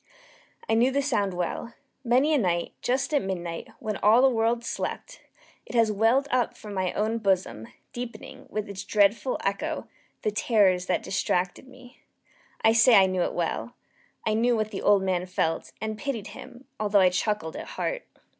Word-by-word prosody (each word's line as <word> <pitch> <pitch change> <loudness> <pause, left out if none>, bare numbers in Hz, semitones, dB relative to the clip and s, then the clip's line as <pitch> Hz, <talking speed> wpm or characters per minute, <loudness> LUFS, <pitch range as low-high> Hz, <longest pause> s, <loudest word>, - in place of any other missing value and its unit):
I - - +1
knew 235 +3 +4
the 280 +1 0
sound 205 -9 0
well. 180 +6 -4 0.3
Many 260 +5 +3
a 295 - +3
night, 175 -5 -1
just 265 +5 0
at 290 - +3
midnight, 175 -3 -4
when 215 -2 -4
all 220 +5 +5
the 270 - +6
world 230 +1 +1
slept, - - -5 0.4
it - - -9
has 230 -2 +4
welled 225 +7 +2
up 250 -2 0
from 210 -1 -9
my 185 -2 -1
own 220 +2 -1
bosom, 185 - 0 0.3
deepening, 245 -1 -8
with 215 -1 -3
its 195 -1 -6
dreadful 210 +5 +2
echo, 300 +12 -2 0.4
the 215 - +1
terrors 195 -4 +2
that - - 0
distracted 180 +4 -1
me. 255 -1 -16 0.6
I 225 0 +5
say 230 +1 +6
I 195 - +7
knew 185 -1 -1
it - - -1
well. 175 +7 -3 0.5
I 220 - +1
knew 235 +2 +2
what 215 -1 -1
the 195 - -5
old 200 -2 +4
man 185 -1 -1
felt, 165 -3 -1
and 215 0 -4
pitied 230 -8 -4
him, 255 +3 -12
although 205 -2 +3
I 185 - +6
chuckled 185 -3 -1
at - - -7
heart. - - -3
215 Hz, 180 wpm, -26 LUFS, 190-245 Hz, 0.6 s, I